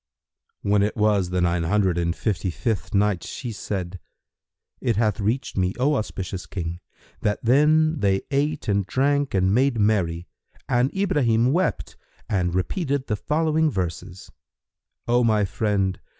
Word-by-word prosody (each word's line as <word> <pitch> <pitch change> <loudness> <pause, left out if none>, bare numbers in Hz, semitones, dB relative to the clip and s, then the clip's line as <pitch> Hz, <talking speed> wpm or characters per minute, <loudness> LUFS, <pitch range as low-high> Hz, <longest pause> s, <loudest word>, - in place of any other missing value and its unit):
When 100 0 +3
it 105 +3 0
was 105 -4 +2
the 90 0 0
Nine 85 0 +1
Hundred 95 +1 +1
and 85 0 0
Fifty 95 -4 -1
fifth 105 +3 -2
Night, 100 -3 +2
She 120 - -6
said, 95 -3 -5 0.8
It 120 -4 0
hath 110 0 +1
reached 115 +5 -2
me, 90 0 0
O 140 +4 +3
auspicious 95 -7 -4
King, 85 -2 -5 0.4
that 105 - 0
then 155 +5 +3
they 95 -3 +1
ate 145 +2 -1
and 100 -2 +1
drank 140 0 +1
and 95 0 +2
made 130 0 +2
merry, 90 -5 +1 0.4
and 125 +2 +2
Ibrahim 135 - +2
wept 180 0 -1 0.3
and 90 -3 0
repeated 140 - -1
the 105 - -1
following 155 +6 +1
verses, 90 - -5 0.8
"O 120 +1 +3
my 110 -3 +3
friend! 100 -2 -1
105 Hz, 145 wpm, -24 LUFS, 95-135 Hz, 0.8 s, When